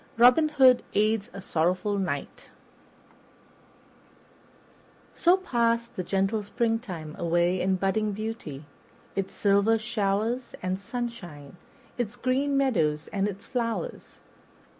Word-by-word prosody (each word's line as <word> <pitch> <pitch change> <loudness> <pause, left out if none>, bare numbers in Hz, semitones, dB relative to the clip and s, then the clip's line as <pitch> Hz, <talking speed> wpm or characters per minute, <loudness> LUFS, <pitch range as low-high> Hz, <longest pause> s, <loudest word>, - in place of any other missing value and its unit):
Robin 250 +7 +6
Hood 260 -4 +6
Aids 215 +1 +2
a 195 - -9
Sorrowful 185 +5 0
Knight 145 -7 -4 2.6
SO 350 +2 +4
PASSED 235 -9 0
the 185 - -3
gentle 195 +4 0
springtime 210 -7 -2
away 175 +2 +1
in 190 +1 +2
budding 200 +3 0
beauty; 205 -9 -6 0.5
its 195 -1 -3
silver 200 +2 +3
showers 220 +2 -1
and 185 +1 -1
sunshine, 200 - -6 0.4
its 235 -2 -2
green 265 +3 0
meadows 160 - +1
and 200 0 +1
its 200 -1 -7
flowers. 245 - -4
210 Hz, 105 wpm, -27 LUFS, 185-240 Hz, 2.6 s, Robin